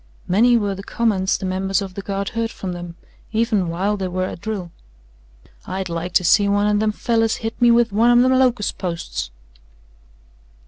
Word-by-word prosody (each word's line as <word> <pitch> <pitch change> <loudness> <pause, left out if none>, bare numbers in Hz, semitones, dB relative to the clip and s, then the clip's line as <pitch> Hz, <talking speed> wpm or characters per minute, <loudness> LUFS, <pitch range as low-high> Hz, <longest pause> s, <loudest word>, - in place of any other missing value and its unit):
Many 235 +6 +4
were 205 -3 -1
the 195 - -7
comments 200 -3 0
the - - -6
members 190 +1 0
of 195 -2 -6
the 200 - -6
Guard 195 0 -3
heard 230 -1 -2
from 190 -5 -6
them, 175 -1 -8 0.4
even 220 -5 +1
while 195 +5 -1
they 190 -1 -2
were 185 +1 -2
at 175 - -7
drill. 200 -6 -4 1.0
"I'd 190 -1 -4
like 170 +1 -4
to - - +3
see 200 +4 +4
one 205 0 +2
o' 210 0 +2
them 215 0 +1
fellers 225 +1 0
hit 225 +2 -5
me 240 - +6
with 235 -1 +4
one 230 +3 +4
of 240 0 +6
them 260 0 +3
locust 245 -5 +1
posts." 170 - -4
200 Hz, 190 wpm, -21 LUFS, 185-225 Hz, 1.0 s, me